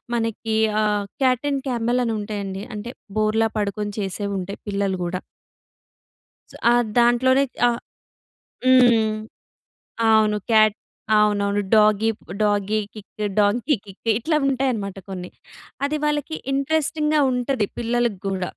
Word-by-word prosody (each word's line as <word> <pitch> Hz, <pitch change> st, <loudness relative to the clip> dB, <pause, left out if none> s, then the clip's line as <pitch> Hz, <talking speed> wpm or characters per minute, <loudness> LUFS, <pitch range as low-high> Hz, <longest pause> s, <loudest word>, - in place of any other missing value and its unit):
మనకి 225 Hz, -1 st, -2 dB, 0.3 s
ఆహ్, 210 Hz, -1 st, 0 dB, 0.2 s
cat 255 Hz, +1 st, +2 dB
and 275 Hz, -1 st, -2 dB
camel 240 Hz, 0 st, 0 dB
అని 230 Hz, -, -1 dB
ఉంటాయండి. 200 Hz, -2 st, -5 dB
అంటే 210 Hz, +3 st, -6 dB, 0.3 s
బోర్లా 215 Hz, +1 st, +2 dB
పడుకొని 205 Hz, 0 st, -2 dB
చేసేవి 200 Hz, +1 st, -3 dB
ఉంటాయి. 190 Hz, +2 st, -6 dB
పిల్లలు 200 Hz, -2 st, -1 dB
కూడ. 175 Hz, +1 st, -3 dB, 1.6 s
ఆ! -, -, +5 dB, 0.3 s
దాంట్లోనే 255 Hz, +3 st, +4 dB, 0.2 s
ఆహ్ 235 Hz, 0 st, -1 dB, 0.9 s
హ్మ్. 240 Hz, -4 st, +5 dB, 0.9 s
అవును. 215 Hz, -1 st, +4 dB
క్యాట్ 215 Hz, -1 st, +5 dB, 0.4 s
అవునవును. 205 Hz, -1 st, +2 dB
Doggy 215 Hz, 0 st, +4 dB, 0.3 s
doggy 205 Hz, 0 st, +1 dB
kick, 215 Hz, 0 st, -9 dB, 0.2 s
donkey 225 Hz, +8 st, +2 dB
kick 200 Hz, +3 st, -7 dB
ఇట్లా 305 Hz, +6 st, +1 dB
ఉంటాయనమాట 250 Hz, -8 st, -1 dB
కొన్ని. 180 Hz, -2 st, -6 dB, 0.6 s
అది 300 Hz, +2 st, -1 dB
వాళ్ళకి 295 Hz, +1 st, -1 dB, 0.2 s
ఇంట్రెస్టింగ్‍గా 300 Hz, +2 st, +1 dB
ఉంటది 250 Hz, -2 st, 0 dB
పిల్లలకి 235 Hz, -3 st, 0 dB
కూడ. 190 Hz, -1 st, -2 dB
220 Hz, 115 wpm, -22 LUFS, 205-250 Hz, 1.6 s, ఆ